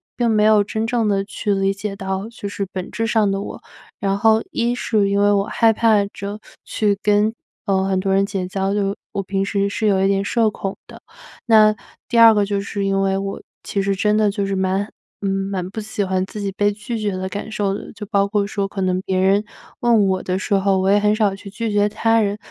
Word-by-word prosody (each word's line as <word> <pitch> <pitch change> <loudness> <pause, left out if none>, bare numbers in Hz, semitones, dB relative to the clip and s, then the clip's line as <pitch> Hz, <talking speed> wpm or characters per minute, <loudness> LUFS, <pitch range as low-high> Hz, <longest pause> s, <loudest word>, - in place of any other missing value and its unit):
并 235 -2 +1
没 215 -1 +3
有 215 -1 +5
真 220 +2 -3
正 225 -2 +1
的 195 -1 0
去 205 +1 -2
理 195 0 +1
解 195 0 -5
到 190 +2 -4
就 230 -3 -7
是 200 0 -3
本 185 -1 -5
质 225 - -2
上 220 -2 +2
的 195 0 -1
我， - - -7 0.4
然 195 -2 0
后 220 +1 +4
1 235 +1 0
是 215 -5 0
因 200 0 +1
为 205 0 +4
我 200 -1 +2
害 225 +1 +3
怕 215 -2 +3
着 200 +1 -7 0.2
去 205 -2 0
跟， 210 +2 +2 0.3
呃， 190 -2 +1
很 190 -1 0
多 190 0 0
人 195 +1 +3
结 195 -2 -3
交， 195 +1 -1
就 200 -1 0 0.2
我 200 - -2
平 195 0 -2
时 200 0 0
是 210 +2 -2
有 195 -2 +3
一 - - +4
点 195 0 +1
社 225 +1 +2
恐 195 -2 -5
的， - - -13 0.4
那 215 -2 +5 0.3
第 235 - -1
2 230 -1 +9
个 205 -1 +2
就 200 0 -1
是 200 0 -3
因 195 0 +1
为 195 0 +1
我 195 0 -4 0.2
其 200 - -2
实 195 0 0
真 210 +1 +2
的 215 -1 +3
就 200 -1 -2
是 195 0 -2
蛮 190 +2 0 0.6
蛮 185 -2 -3
不 220 - -5
喜 210 0 -4
欢 185 0 0
自 210 - -8
己 200 -1 -2
被 205 +1 +1
拒 215 +3 -5
绝 210 -2 -1
的 185 0 -3
感 205 +3 -6
受 205 -2 -1
的， - - -10
就 210 -1 -8
包 200 -1 +1
括 200 0 0
说 200 -1 -2
可 200 - -7
能 185 0 0
别 190 -1 -1
人 195 +2 +3 0.4
问 230 -4 +4
我 190 -1 0
的 185 0 -1
时 205 - -2
候， 195 0 +2
我 190 +1 +1
也 200 - +5
很 210 0 +3
少 210 -3 +1
去 200 0 -11
拒 225 +3 -3
绝 205 0 +3
他 225 +2 +2
人。 205 -1 -1
200 Hz, 255 characters per minute, -20 LUFS, 195-215 Hz, 0.6 s, 2